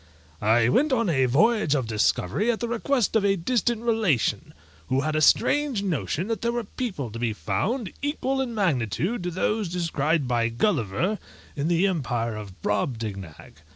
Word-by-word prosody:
I 115 Hz, +2 st, +4 dB
went 280 Hz, -, +2 dB
on 230 Hz, -8 st, +2 dB
a 135 Hz, -4 st, +2 dB
voyage 160 Hz, -, +3 dB
of 130 Hz, -4 st, 0 dB
discovery 110 Hz, -, 0 dB
at 230 Hz, -, +1 dB
the 235 Hz, -, -2 dB
request 235 Hz, 0 st, 0 dB
of 220 Hz, -, +3 dB
a 200 Hz, -1 st, +3 dB
distant 230 Hz, +4 st, 0 dB
relation, 220 Hz, -, +1 dB, 0.4 s
who 130 Hz, +1 st, +1 dB
had 155 Hz, +1 st, -1 dB
a 155 Hz, -, +1 dB
strange 275 Hz, -, +3 dB
notion 175 Hz, -1 st, -1 dB
that 225 Hz, -2 st, -3 dB
there 235 Hz, -, 0 dB
were 240 Hz, 0 st, -2 dB
people 195 Hz, -, -4 dB
to 115 Hz, -, -7 dB
be 115 Hz, -2 st, 0 dB
found 185 Hz, -, -2 dB
equal 270 Hz, -2 st, -1 dB
in 240 Hz, -3 st, -3 dB
magnitude 170 Hz, -, 0 dB
to 175 Hz, -, -2 dB
those 200 Hz, +3 st, -1 dB
described 160 Hz, -4 st, 0 dB
by 120 Hz, -2 st, +1 dB
Gulliver 145 Hz, -, 0 dB, 0.4 s
in 145 Hz, +1 st, -1 dB
the 170 Hz, +2 st, +2 dB
empire 120 Hz, -, -1 dB
of 100 Hz, -3 st, -10 dB
BROBDIGNAG. 105 Hz, -, -3 dB
170 Hz, 170 wpm, -25 LUFS, -, 0.4 s, I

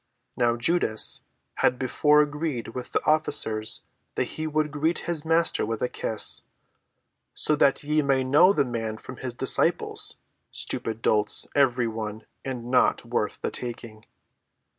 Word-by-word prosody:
Now 120 Hz, -1 st, +1 dB
Judas 120 Hz, -3 st, +2 dB, 0.4 s
had 125 Hz, -, +2 dB
before 150 Hz, +4 st, +3 dB
agreed 150 Hz, -5 st, -4 dB
with 125 Hz, +2 st, -7 dB
the -, -, -1 dB
officers 110 Hz, -8 st, +1 dB, 0.3 s
that -, -, +1 dB
he 155 Hz, 0 st, -4 dB
would 155 Hz, -1 st, -1 dB
greet 155 Hz, +3 st, 0 dB
his 170 Hz, -3 st, -2 dB
Master 165 Hz, +1 st, +1 dB
with 115 Hz, 0 st, -3 dB
a -, -, +2 dB
kiss. 110 Hz, -, +2 dB, 0.9 s
"So 155 Hz, -, +1 dB
that 140 Hz, 0 st, +2 dB
ye 150 Hz, +1 st, +1 dB
may 135 Hz, -2 st, +1 dB
know 150 Hz, +9 st, +5 dB
the 145 Hz, -8 st, +1 dB
man 115 Hz, -3 st, -4 dB
from 130 Hz, +3 st, -11 dB
his 125 Hz, -2 st, -6 dB
disciples,—stupid 115 Hz, -1 st, -1 dB
dolts 105 Hz, -1 st, +3 dB
every 125 Hz, -4 st, +2 dB
one 110 Hz, -1 st, -6 dB, 0.2 s
and 125 Hz, -2 st, -6 dB
not 130 Hz, -, +2 dB
worth -, -, -3 dB
the -, -, -2 dB
taking." 115 Hz, -3 st, -7 dB
130 Hz, 140 wpm, -25 LUFS, 115-150 Hz, 0.9 s, know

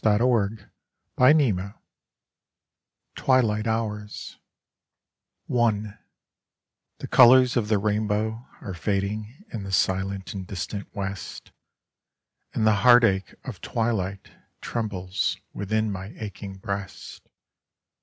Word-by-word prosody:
Digitized 110 Hz, -1 st, +2 dB, 0.5 s
by 125 Hz, +2 st, +6 dB
Google 105 Hz, -11 st, +2 dB, 1.4 s
Twilight 115 Hz, -5 st, +2 dB
Kours 105 Hz, -2 st, -3 dB, 1.1 s
I -, -, -6 dB, 1.4 s
Tne -, -, -7 dB
colors 125 Hz, 0 st, +7 dB
of 115 Hz, -4 st, +1 dB
the 110 Hz, -1 st, +2 dB
rainbow 105 Hz, +3 st, -1 dB
are 95 Hz, -, -6 dB
fading 105 Hz, -, -3 dB
in 110 Hz, -, -3 dB
the 95 Hz, 0 st, -6 dB
silent 95 Hz, +1 st, 0 dB
and 95 Hz, -2 st, -6 dB
distant 100 Hz, +3 st, -5 dB
West, 100 Hz, -1 st, -6 dB, 1.0 s
and 110 Hz, -, 0 dB
the 110 Hz, -1 st, +4 dB
heartache 115 Hz, -6 st, +5 dB
of 115 Hz, -9 st, -8 dB
twili.^ht 105 Hz, -5 st, -2 dB, 0.3 s
trembles 100 Hz, -5 st, -2 dB, 0.2 s
within 110 Hz, +1 st, -1 dB
ay 95 Hz, +3 st, -8 dB
aching 100 Hz, -2 st, -7 dB
breast. 100 Hz, 0 st, -7 dB
105 Hz, 95 wpm, -25 LUFS, 100-115 Hz, 1.4 s, colors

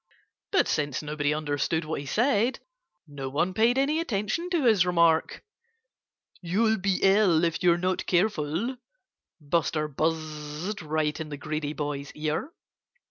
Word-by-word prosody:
But -, -, +3 dB
since 145 Hz, -1 st, -1 dB
nobody 150 Hz, -1 st, -1 dB
understood 150 Hz, +1 st, -1 dB
what 155 Hz, -1 st, -3 dB
he 140 Hz, -, -7 dB
said, 235 Hz, -, +2 dB, 0.5 s
no 140 Hz, -2 st, -6 dB
one 170 Hz, +7 st, 0 dB
paid 230 Hz, +5 st, +3 dB
any 290 Hz, +4 st, +2 dB
attention 245 Hz, -, -2 dB
to 340 Hz, -5 st, +1 dB
his 215 Hz, -6 st, +5 dB
remark. 170 Hz, -2 st, +2 dB, 1.0 s
"You'll 220 Hz, +5 st, +1 dB
be 190 Hz, 0 st, +1 dB
ill, 195 Hz, -4 st, +4 dB
if 165 Hz, -1 st, 0 dB
you're 175 Hz, -1 st, +4 dB
not 185 Hz, +1 st, -1 dB
careful," 185 Hz, -, 0 dB, 0.6 s
Buster 155 Hz, 0 st, 0 dB
buzzed 155 Hz, +4 st, -3 dB
right 155 Hz, -1 st, -1 dB
in 160 Hz, -1 st, -5 dB
the 145 Hz, -, -6 dB
greedy 150 Hz, 0 st, -3 dB
boy's 145 Hz, -2 st, -4 dB
ear. 155 Hz, -, -2 dB
165 Hz, 135 wpm, -27 LUFS, 150-205 Hz, 1.0 s, his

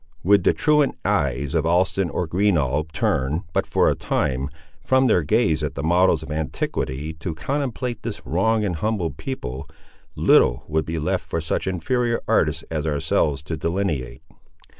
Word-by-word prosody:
Would 100 Hz, +1 st, +4 dB
the -, -, +4 dB
truant 150 Hz, -2 st, +2 dB
eyes 70 Hz, 0 st, 0 dB
of 80 Hz, -3 st, +2 dB
Alston 90 Hz, +1 st, +2 dB
or 90 Hz, +4 st, -2 dB
Greenough 80 Hz, -5 st, +1 dB
turn, 70 Hz, +3 st, 0 dB
but -, -, 0 dB
for -, -, +2 dB
a -, -, +4 dB
time, 65 Hz, +3 st, -1 dB, 0.3 s
from 130 Hz, 0 st, +3 dB
their 110 Hz, -8 st, +4 dB
gaze 80 Hz, -2 st, +2 dB
at 75 Hz, -, -3 dB
the 70 Hz, -, -4 dB
models 85 Hz, -1 st, +3 dB
of 80 Hz, -, -8 dB
antiquity, 75 Hz, -1 st, -3 dB
to 85 Hz, -2 st, -4 dB
contemplate 125 Hz, -, -3 dB
this 110 Hz, -3 st, -6 dB
wronged 105 Hz, +5 st, +1 dB
and 90 Hz, -5 st, -2 dB
humbled 105 Hz, -4 st, -2 dB
people, 75 Hz, -, -5 dB, 0.5 s
little -, -, +4 dB
would 80 Hz, 0 st, 0 dB
be 80 Hz, +1 st, -3 dB
left 75 Hz, -, -1 dB
for 85 Hz, -, -2 dB
such 80 Hz, +3 st, -2 dB
inferior 115 Hz, +7 st, 0 dB
artists 75 Hz, +1 st, +1 dB
as 80 Hz, -1 st, -2 dB
ourselves 75 Hz, -1 st, 0 dB
to 80 Hz, +2 st, -4 dB
delineate. 85 Hz, -5 st, -2 dB
80 Hz, 160 wpm, -23 LUFS, 75-105 Hz, 0.5 s, Would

